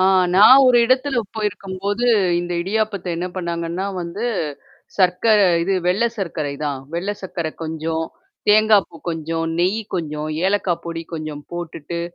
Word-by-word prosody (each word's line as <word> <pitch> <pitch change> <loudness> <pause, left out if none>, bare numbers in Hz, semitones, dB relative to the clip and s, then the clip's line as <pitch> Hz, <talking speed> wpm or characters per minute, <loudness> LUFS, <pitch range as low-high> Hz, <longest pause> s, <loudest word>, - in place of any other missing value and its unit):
ஆ - - +4 0.3
நான் 235 +8 +8
ஒரு 250 - +5
இடத்துல 260 +2 +1 0.2
போயிருக்கும்போது, 205 +1 -3 0.4
இந்த 175 0 -4
இடியாப்பத்த 205 -1 -2
என்ன 175 +2 -2
பண்ணாங்கன்னா 170 0 -3
வந்து, 175 +6 -5 0.7
சர்க்கர 190 +4 +4 0.2
இது 195 +3 0
வெள்ளை 205 +7 +2
சர்க்கரை 155 -6 -3
தான். 140 -3 -2
வெள்ள 185 +4 -2
சர்க்கரை 170 -4 -4
கொஞ்சம், 160 0 -2 0.5
தேங்காய்ப்பூ 210 -5 +4
கொஞ்சம், 165 0 -3
நெய் 190 +5 +1
கொஞ்சம், 150 -3 -3 0.2
ஏலக்காய் 190 -3 0
பொடி 165 0 -5
கொஞ்சம் 155 -2 -6
போட்டுட்டு 170 -1 -5
180 Hz, 130 wpm, -20 LUFS, 165-205 Hz, 0.7 s, நான்